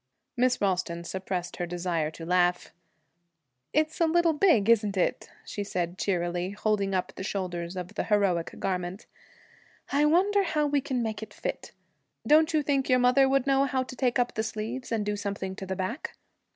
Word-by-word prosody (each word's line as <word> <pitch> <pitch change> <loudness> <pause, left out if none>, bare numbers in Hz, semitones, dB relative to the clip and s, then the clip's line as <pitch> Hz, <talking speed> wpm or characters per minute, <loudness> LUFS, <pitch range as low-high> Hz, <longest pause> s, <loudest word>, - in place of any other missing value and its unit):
Miss 250 0 +2
Ralston 180 -3 -1
suppressed 185 0 -4
her 175 - -2
desire 170 -3 -1
to 165 +1 -9
laugh. 180 0 +1 1.0
'It's 310 +2 0
a 335 - +5
little 335 0 +3
big, 300 - +4
isn't 210 -4 +3
it?' 180 - 0 0.2
she 205 - -4
said 180 -2 -3
cheerily, 175 -1 -1
holding 200 -1 0
up 185 - -2
the - - -7
shoulders 180 -3 -3
of 180 -1 -5
the - - -2
heroic 195 -6 +1
garment. 180 +1 -3 0.9
'I 290 +2 +3
wonder 385 +6 +4
how 315 -5 0
we 290 -1 +1
can 260 -3 -2
make 220 -2 -3
it 220 - -9
fit. - - -5 0.5
Don't 310 +2 +5
you 310 -2 +2
think 275 -2 0
your 255 - +5
mother 250 +2 +4
would 270 -1 +2
know 275 0 +3
how 260 -1 0
to 255 - -9
take 250 -1 +1
up 245 -1 +1
the 220 - -1
sleeves 220 +4 -5
and 220 -2 0
do 210 0 -1
something 200 -2 -4
to 190 - -7
the 190 - -2
back?' 190 - -4
210 Hz, 185 wpm, -28 LUFS, 185-270 Hz, 1.0 s, a